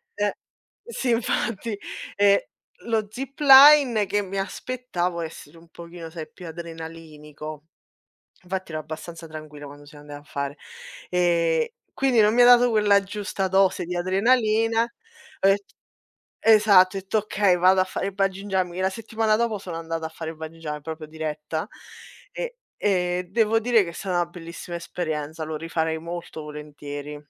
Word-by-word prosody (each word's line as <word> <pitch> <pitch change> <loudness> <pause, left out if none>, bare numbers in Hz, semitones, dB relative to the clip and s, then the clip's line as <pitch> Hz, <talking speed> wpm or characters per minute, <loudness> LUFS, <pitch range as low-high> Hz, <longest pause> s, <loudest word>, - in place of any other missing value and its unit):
Eh, 205 -1 0 0.5
sì 270 - -3
infatti. 230 -2 -1 0.4
Ehm, 200 0 +5 0.5
lo 225 -2 0
zipline, 270 -2 +6
che 205 +1 +1
mi 195 0 -6
aspettavo 195 -5 -3
essere 160 -1 -9
un 165 +1 -17
pochino, 170 -1 -10
sai, 160 -1 -7
più 180 - -11
adrenalinico; 160 -2 -9 0.8
infatti 185 -1 -4
ero 155 - -3
abbastanza 165 +2 -8
tranquilla 155 -2 -9
quando 145 +1 -12
siamo 145 0 -14
andati 145 0 -9
a - - -20
fare 140 +1 -3 0.5
ehm, 170 -3 +2 0.3
quindi 260 -4 +3
non 210 +1 +4
mi 245 - +5
ha - - +8
dato 245 0 +7
quella 205 -2 +4
giusta 195 -1 -3
dose 190 -1 +3
di 180 +1 -4
adrenalina. 225 +4 +2 0.5
Ett 195 +1 +4 0.8
esatto, 205 -4 +6
ho - - -2
etto: 195 +3 -1
"Okay, 205 -3 +2
vado 185 +2 +5
a - - +4
fare 185 +1 -4
il 200 - -4
Bungee 195 0 -1
jumping." 185 -3 -1
E - - -1
la 190 - +2
settimana 220 +1 0
dopo 225 -2 0
sono 180 -4 -7
andata 165 0 -4
a - - -5
fare 160 -1 -6
il 160 - -10
Bungee 160 +1 -8
jum 150 -2 -5
proprio 160 0 -6
diretta 155 +1 -4 0.7
e - - -5 0.2
e 180 -2 +1
devo 225 +1 +3
dire 230 -1 +4
che - - -7
è - - -11
stata 180 0 -2
'na 175 - +1
bellissima 170 0 -8
esperienza, 160 -2 -4
lo 155 0 -4
rifarei 160 0 -2
molto 170 -1 -7
volentieri. 150 -1 -8
180 Hz, 160 wpm, -24 LUFS, 160-210 Hz, 0.8 s, ha